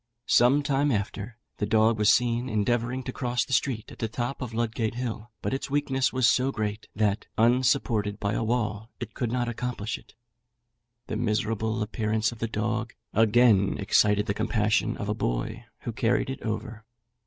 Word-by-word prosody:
Some 135 +4 +4
time 140 0 +2
after, 105 +1 -3 0.2
the 105 - -1
dog 110 +1 +3
was 105 0 +4
seen 120 +1 +1
endeavouring 120 +4 0
to 125 - -4
cross 125 -1 -1
the - - -5
street 115 -2 0
at - - -13
the 115 - -1
top 120 +5 -4
of 125 -3 -4
Ludgate 115 -1 -1
Hill; 120 -2 -4
but - - -1
its 135 - -3
weakness 135 -2 +1
was 130 -2 +3
so 130 +3 +3
great, 105 -3 -3
that, 105 -1 0
unsupported 115 -3 +2
by 100 0 -1
a 110 - 0
wall, 110 -2 -1
it 115 -3 -6
could 120 -4 -2
not 120 -1 0
accomplish 120 -2 -3
it. - - -22 0.9
The 110 - -3
miserable 110 0 0
appearance 110 0 0
of 120 - -11
the 115 - -1
dog 110 +1 -2 0.2
again 110 -2 +4
excited 105 +1 +3
the 100 - 0
compassion 110 0 +1
of 105 - -4
a 105 - +1
boy, 110 - -2 0.2
who 120 - -4
carried 120 +3 +1
it 135 - -6
over. 110 0 -4
115 Hz, 175 wpm, -27 LUFS, 105-125 Hz, 0.9 s, Some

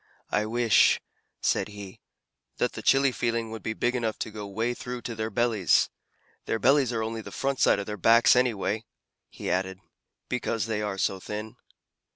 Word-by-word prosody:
"I 105 +1 +1
wish," 115 -1 +4 0.4
said - - +1
he, 100 -2 -10 0.6
"that - - 0
the - - -6
chilly 135 0 +4
feeling 115 -2 -1
would 110 - -6
be 110 - -3
big 120 +3 0
enough 115 -3 -1
to 110 - -4
go 105 -1 -7
way 115 +5 -1
through 125 0 -6
to 120 - -4
their 110 0 -3
bellies. 110 -5 +2 0.5
Their - - 0
bellies 135 +1 +3
are 115 -2 -1
only 110 0 -4
the - - -10
front 135 -1 -2
side - - +5
of 100 - -3
their 105 0 -5
backs, 115 +6 +6
anyway," 110 -3 +1 0.5
he - - -5
added, 95 0 -1 0.5
"because 115 -3 -1
they 110 -2 -2
are 105 -2 -3
so 95 0 0
thin." 105 +4 -6
110 Hz, 185 wpm, -27 LUFS, 105-120 Hz, 0.6 s, backs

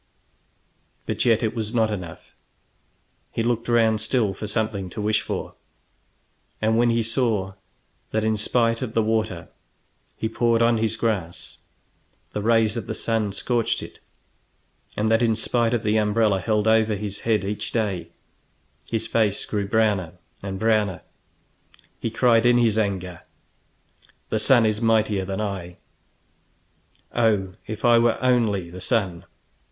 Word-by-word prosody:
But - - -2
yet 115 -1 +3
it 110 - 0
was 110 0 -3
not 110 -2 +2
enough. 90 -5 -7 1.0
He 115 - -2
looked 115 0 -1
round 115 -2 +3
still 110 -3 +1
for 105 +3 -6
something 105 -3 -2
to 90 - -8
wish 105 +1 +1
for, - - -5 1.1
and 110 +1 +1
when 120 +1 +3
he 115 0 +1
saw 110 -5 0 0.6
that 110 0 -1
in 110 0 +1
spite 115 +2 +1
of 120 -4 -5
the 115 - +3
water 110 -6 -1 0.7
he 110 - -1
poured 115 +1 +2
on 115 -1 +3
his 110 0 0
grass 100 -7 -3 0.7
the 105 - -2
rays 110 0 +3
of 115 -4 -5
the - - -3
sun 110 -3 -1
scorched 115 +3 -1
it, - - -11 1.0
and 105 - +1
that 115 +1 +3
in 115 -2 +2
spite 115 +1 0
of 120 -2 0
the 105 +1 +2
umbrella 105 -1 +2
held 105 +1 0
over 110 -1 +3
his 100 0 -5
head 110 -3 +1
each 100 +2 -4
day 100 -7 -1 0.8
his 115 -1 -2
face 105 -3 0
grew 100 -2 -2
browner 105 -6 +1 0.3
and 95 -1 -5
browner, 105 -4 +1 1.0
he - - -2
cried 115 0 +3
in 120 0 +5
his 115 -3 +3
anger: 95 -4 -2 1.1
"The 110 - 0
sun 120 0 +4
is 110 0 0
mightier 110 -4 +2
than 95 +1 -4
I; 95 -4 -5 1.4
oh, 105 -5 +1
if 110 +2 -4
I 120 -1 +6
were 115 0 +2
only 110 -9 +1
the 90 +1 -9
sun!" 95 -4 -1
110 Hz, 150 wpm, -23 LUFS, 100-115 Hz, 1.4 s, I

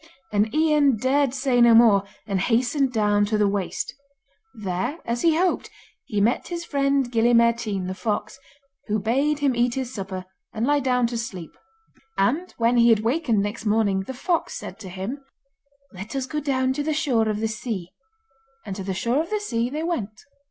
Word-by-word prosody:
And 210 +1 +1
Ian 300 -5 +3
dared 270 +3 +2
say 260 -2 +1
no 235 -1 +7
more, 220 -4 +6 0.2
and 195 -2 -1
hastened 250 +6 +1
down 210 -3 +2
to 215 +1 0
the 210 -1 +3
waste. 200 -2 -2 0.6
There, 210 - -3
as 235 +1 -2
he 325 -2 +3
hoped, 365 +1 0 0.4
he 210 -6 -2
met 220 +5 +1
his 340 -1 -5
friend 275 -3 +1
Gille 235 0 +3
Mairtean 230 -5 +2
the 185 - -3
fox, 215 +6 -3 0.5
who 210 0 +1
bade 270 +8 +1
him 280 -3 +1
eat 240 0 +1
his 260 -1 -4
supper 190 -2 -5 0.3
and 225 +2 0
lie 290 +2 +3
down 250 -2 +1
to 235 0 -2
sleep. 190 -9 -6 0.7
And 305 - +1
when 235 +1 +2
he 235 0 +6
had 220 -2 +4
wakened 230 -3 +1
next 210 +2 -4
morning 210 -2 +2
the 265 - -5
fox 340 +6 -1
said - - -8
to 195 -4 -8
him: 195 +10 -6 0.7
'Let 195 +7 -8
us 270 -1 -1
go 300 +3 -3
down 260 -3 0
to 290 - -2
the 310 0 -1
shore 250 -8 +1
of 210 -1 -1
the 220 - 0
sea.' 215 -5 -5 0.7
And 195 -3 -5
to 195 - -5
the 190 0 -3
shore 240 +9 +1
of 330 - -6
the 425 - -1
sea 240 - -1
they 300 +4 -4
went. 220 - -3
235 Hz, 195 wpm, -24 LUFS, 210-275 Hz, 0.7 s, no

